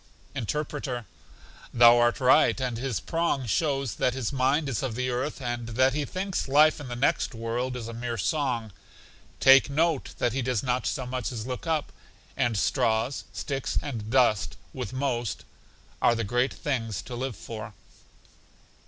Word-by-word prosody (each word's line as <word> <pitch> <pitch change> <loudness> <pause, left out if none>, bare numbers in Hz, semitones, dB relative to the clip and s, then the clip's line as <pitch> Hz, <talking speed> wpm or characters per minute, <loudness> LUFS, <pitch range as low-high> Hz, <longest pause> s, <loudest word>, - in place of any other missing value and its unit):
Interpreter: 135 -1 -3 0.7
Thou 120 0 +7
art 120 +3 +3
right, 135 +2 +5
and 125 -3 -1
his 125 -6 -2
prong 165 - -1
shows 135 +1 0
that 125 - +1
his 130 -1 -2
mind 135 +3 +2
is 125 -6 -2
of 130 -4 -3
the 125 +1 -1
earth, 130 +5 -2
and 120 -2 -3
that 130 +3 +2
he 150 0 -1
thinks 185 0 -3
life 150 +3 +5
in 145 - -7
the 120 - -5
next 125 0 +1
world 120 +3 -2
is 120 -2 -5
a 115 - -6
mere 120 0 -4
song; 120 - -1 0.7
take 135 +1 +7
note 160 0 0
that 120 - 0
he 135 - -1
does 125 -3 -1
not 125 -1 0
so 130 -4 -2
much 125 0 -3
as 115 -3 -5
look 130 +5 -5
up; 160 -2 0 0.4
and 120 -3 +1
straws, 115 +3 +1
sticks, 135 -2 -3
and 115 -7 -5
dust, 115 -6 +2 0.2
with 125 -6 -5
most, 125 -5 -2 0.6
are 120 - +4
the 115 - -1
great 120 +5 0
things 115 -8 -2
to 125 - -7
live 130 -1 -3
for. 110 -2 -8
125 Hz, 170 wpm, -27 LUFS, 115-135 Hz, 0.7 s, Thou